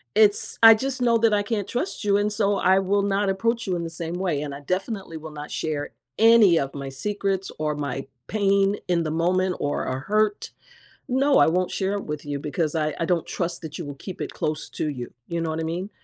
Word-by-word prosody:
it's 210 -1 +3
I 225 0 +11
just 260 +3 -3
know 235 -1 +4
that 225 -1 +3
I 205 0 +2
can't 205 -2 -2
trust 250 - -3
you, 200 -1 +3
and 205 +1 +1
so 205 -1 +1
I 190 0 +4
will 195 +1 +1
not 200 0 +1
approach 230 +4 0
you 185 - 0
in 170 - -3
the 165 - -4
same 165 +1 -5
way, 175 -6 -1
and 145 -2 -5
I 140 - -9
definitely 190 +1 -3
will 160 0 -9
not 150 0 -8
share 150 -2 -3 0.3
any 225 -6 +7
of 135 0 -3
my 140 -1 -5
secrets 195 +6 -2
or 150 -1 -1
my 140 -2 -4 0.2
pain 200 -1 +2
in 175 -2 +1
the 155 - -2
moment 180 +3 +1
or 145 - -1
a 130 0 -2
hurt. 210 +6 0 0.6
No, 275 +2 +3
I - - +6
won't 180 +3 +1
share 195 0 -1
it 200 - -3
with 150 -1 -5
you 145 -1 -3
because 150 +2 -2
I 155 -1 0
I 165 - 0
don't 170 -1 0
trust 175 -1 -3
that 155 -2 -7
you - - -4
will 145 -1 -7
keep 185 +6 -8
it - - -4
close 155 0 -2
to 155 - -2
you, 125 -4 -6 0.2
you 170 -1 -2
know 165 - -2
what 160 0 -2
I - - -2
mean? 175 +5 -3
185 Hz, 240 wpm, -24 LUFS, 155-205 Hz, 0.6 s, I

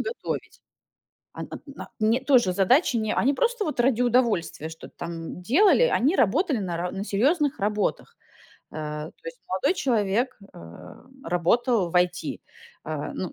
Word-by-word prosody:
готовить, 475 +1 -5 0.7
она - - -7 0.2
на 280 -1 -10
Не, 220 +3 +2
тоже 250 -9 +3
задачи, 235 - +3
не- 220 -1 -1
они 275 +3 +2
просто 480 - 0
вот 300 -6 -4
ради 245 -1 +3
удовольствия 235 - +1
что-то 160 0 -12
там 165 +1 -6
делали. 360 - +4
Они 320 - +2
работали 275 - +2
на 180 -4 -3
ра 175 +1 -3
на 195 - -4
серьезных 285 - +1
работах. 210 - -1 0.6
А, 150 0 -5
то - - -27
есть - - -8
молодой 190 - +1
человек, 240 - 0 0.2
э, - - -11 0.7
работал 180 +4 +1
в - - -15
IT, 180 0 0 0.4
а, - - -4
ну, - - -4
230 Hz, 150 wpm, -25 LUFS, 180-280 Hz, 0.7 s, делали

